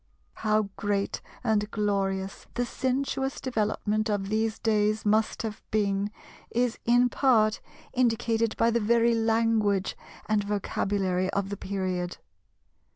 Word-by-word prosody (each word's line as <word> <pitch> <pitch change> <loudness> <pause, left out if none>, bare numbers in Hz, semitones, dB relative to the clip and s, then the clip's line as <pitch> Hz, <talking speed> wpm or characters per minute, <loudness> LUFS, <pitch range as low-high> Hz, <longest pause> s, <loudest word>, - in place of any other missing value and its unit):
How 215 0 +2
great 205 -2 -1 0.2
and 215 -3 +1
glorious 195 -2 -1
the 245 +1 0
sensuous 265 +1 -1
development 215 -2 -1
of 200 -2 -1
these 220 +1 0
days 215 -1 +1
must 215 +2 +2
have 220 -1 -5
been 200 -1 +1 0.4
is 240 0 0
in 245 +1 +5
part 230 -4 +3 0.3
indicated 230 -2 +1
by 230 - +3
the 235 - +2
very 235 +2 +3
language 225 -3 +2 0.3
and 210 -1 +1
vocabulary 195 -2 -1
of 200 0 -1
the 200 - -4
period. 185 -3 -3
215 Hz, 120 wpm, -27 LUFS, 200-230 Hz, 0.4 s, in